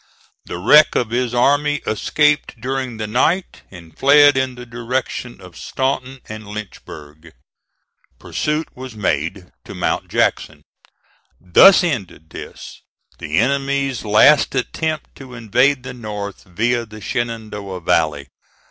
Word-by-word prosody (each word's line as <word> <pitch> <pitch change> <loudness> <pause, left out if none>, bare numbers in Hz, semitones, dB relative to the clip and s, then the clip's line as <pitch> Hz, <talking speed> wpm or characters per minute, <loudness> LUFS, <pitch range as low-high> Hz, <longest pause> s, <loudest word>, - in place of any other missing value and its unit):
The - - -6
wreck 150 +12 +5
of 115 -3 0
his 125 0 -1
army 145 +4 +2
escaped 150 +4 0
during 130 -1 -4
the 110 - -3
night, 155 - 0
and 85 -4 -14
fled 145 +1 +6
in 130 -1 -1
the 125 0 -10
direction 120 0 -4
of 90 -2 -14
Staunton 130 -1 -3
and 110 -1 -9
Lynchburg. 80 -7 -10 0.8
Pursuit 150 +1 -2
was 130 -2 -9
made 90 -1 -2
to - - -10
Mount - - -2
Jackson. - - -1 0.8
Thus 180 - +6
ended 100 - -4
this, - - -10 0.4
the 75 +2 -3
enemy's 135 +1 0
last 120 +8 +4
attempt 155 +4 -3
to 130 -2 -11
invade 125 +4 +1
the 125 - -7
North 105 -4 -7
via 115 +6 -1
the 110 0 -11
Shenandoah 110 -5 -5
Valley. 80 -5 0
120 Hz, 125 wpm, -19 LUFS, 100-135 Hz, 0.8 s, fled